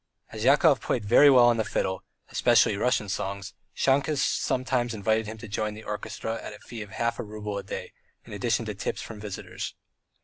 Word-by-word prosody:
As 110 -1 -5
Yakov 140 +2 +5
played 115 -4 -1
very 130 +7 +7
well 125 -3 +7
on 120 -1 +4
the 110 - +1
fiddle, 95 -3 -2 0.3
especially - - +4
Russian 110 0 +1
songs, 100 +1 -4 0.2
Shahkes 140 +3 +2
sometimes 130 -4 0
invited 110 +1 0
him 110 +1 -6
to 115 +1 -9
join 105 +1 -2
the 110 - -10
orchestra 110 +2 -4
at - - -7
a - - -10
fee 115 -2 -9
of 105 - -8
half 115 +2 -2
a - - -2
rouble 105 -1 -5
a - - -7
day, 95 - -6 0.3
in - - -10
addition 115 +2 0
to 105 - -3
tips 95 0 -4
from 110 - -8
the 105 - -6
visitors. 100 - -6
110 Hz, 205 wpm, -27 LUFS, 105-120 Hz, 0.3 s, very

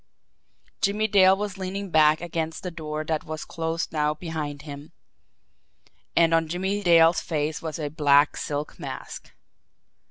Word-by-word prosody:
Jimmie 210 +2 +1
Dale 190 -2 +5
was 205 -1 -4
leaning 190 +1 -4
back 155 0 +4
against 165 -2 -4
the 180 - -4
door 155 -2 -5
that 155 -1 -1
was 155 0 -6
closed 165 0 -3
now 150 -1 +1
behind 150 -3 -5
him 145 0 -10 1.2
and 165 -1 +4
on 165 -1 +2
Jimmie 190 +5 -2
Dale's 165 -2 +5
face 155 0 -2
was 160 -2 -5
a 155 -2 -3
black 145 -1 +3
silk 145 0 -4
mask. - - -8
160 Hz, 145 wpm, -25 LUFS, 150-180 Hz, 1.2 s, Dale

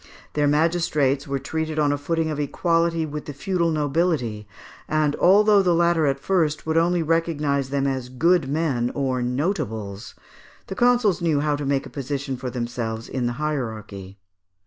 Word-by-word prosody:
Their 150 -1 +2
magistrates 150 -3 +1
were 140 0 -1
treated 155 +3 -3
on 150 -2 +2
a - - +1
footing 160 +2 -1
of 150 - -4
equality 165 +2 +1
with 150 0 -6
the 145 - -6
feudal 170 +4 0
nobility, 145 -8 0 0.4
and 155 -1 +1
although 205 +2 +5
the 180 -3 +2
latter 170 -2 +3
at 135 0 0
first 160 -2 0
would 160 0 -1
only 170 +1 +2
recognise 150 -4 0
them 140 0 0
as 130 -2 -2
"good 160 +3 +2
men" 140 -6 0
or 130 -3 -1
notables, 120 - -3 0.5
the 195 - -6
consuls 240 -7 +3
knew 160 -4 +1
how 150 -1 +1
to 145 -1 -4
make 140 -1 0
a - - -10
position 140 -1 -4
for 125 0 -5
themselves 120 -2 -4
in 125 -2 -2
the 120 - -2
hierarchy. 110 -9 -5
150 Hz, 170 wpm, -23 LUFS, 130-165 Hz, 0.5 s, although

